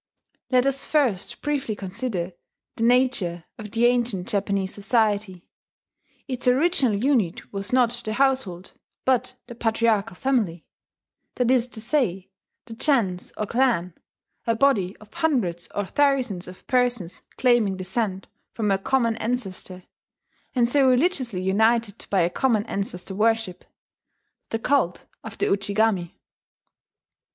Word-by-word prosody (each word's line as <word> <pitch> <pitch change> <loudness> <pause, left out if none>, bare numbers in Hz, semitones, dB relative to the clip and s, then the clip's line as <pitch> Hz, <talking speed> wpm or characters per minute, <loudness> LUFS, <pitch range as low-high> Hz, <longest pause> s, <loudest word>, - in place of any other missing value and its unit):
Let 255 -1 +3
us 275 0 0
first 255 -11 0
briefly 280 -7 -1
consider 190 -2 -4 0.4
the 225 - -2
nature 235 -9 +2 0.2
of 210 -1 -7
the 230 +3 +1
ancient 240 -6 +1
Japanese 200 -1 -1
society. 205 -3 0 0.8
Its 255 -2 -4
original 265 - +3
unit 220 -7 0
was 195 +2 -4
not 250 -2 +4
the 235 -3 -3
household, 250 -9 0 0.3
but 255 -1 +1
the 240 - -9
patriarchal 225 -3 +1
family, 210 -10 0 0.7
that 250 0 +2
is 250 -2 +3
to 240 -2 -9
say, 215 - -1 0.3
the 230 - -9
gens 225 -9 0
or 215 - -1
clan, 220 -8 +1 0.5
a 230 - +2
body 215 -8 +2
of 215 - -18
hundreds 245 - 0
or 205 - -1
thousands 260 -8 +1
of 180 0 -12
persons 240 -8 0 0.2
claiming 235 -7 +3
descent 190 +1 -2 0.3
from 210 -3 0
a 195 - +2
common 235 +1 +1
ancestor, 195 -6 -4 0.7
and 240 -2 +3
so 270 +1 +4
religiously 255 - +1
united 220 +2 +1
by 195 -2 +3
a 170 - +2
common 225 -4 +1
ancestor 195 -1 -4
worship, 225 -2 0 0.9
the 225 - -1
cult 235 -7 0 0.2
of 225 - -8
the - - +1
Ujigami. 200 -2 +1
225 Hz, 130 wpm, -24 LUFS, 195-250 Hz, 0.9 s, not